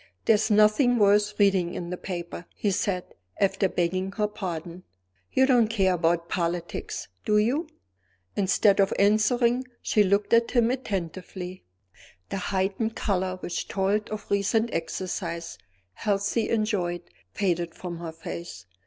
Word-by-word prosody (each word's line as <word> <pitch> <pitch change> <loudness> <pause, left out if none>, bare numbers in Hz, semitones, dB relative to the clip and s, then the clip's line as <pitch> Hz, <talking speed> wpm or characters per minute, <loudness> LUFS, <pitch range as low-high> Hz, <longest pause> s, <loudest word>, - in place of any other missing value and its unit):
"There - - +6
is 215 +1 +1
nothing 215 +4 +4
worth 205 0 +4
reading 190 -4 +3
in 175 0 -5
the - - -1
paper," 175 -1 -6
he 205 - 0
said, 185 -1 -2 0.3
after 195 0 +2
begging 185 +2 -1
her 210 0 0
pardon. 175 -4 -6 0.5
"You 265 - +4
don't 245 -4 +4
care 195 -4 +2
about 170 0 +1
politics, 170 -1 -3 0.2
do 210 - +2
you?" 250 +10 +1 0.7
Instead 200 +1 +3
of 195 - +4
answering, 235 +4 +3 0.2
she 210 - +2
looked 200 +2 +2
at 230 0 +5
him 240 -2 +3
attentively. 185 -5 -5 0.6
The - - -3
heightened 195 +4 -1
color 185 -2 -1
which 175 - -3
told 200 +2 0
of 215 -1 -5
recent 220 +3 +1
exercise, 170 0 -4 0.3
healthily 205 - 0
enjoyed, 205 -6 0 0.3
faded 175 -4 0
from 175 -2 -6
her 170 -1 -5
face. 160 - -8
195 Hz, 135 wpm, -26 LUFS, 175-215 Hz, 0.7 s, There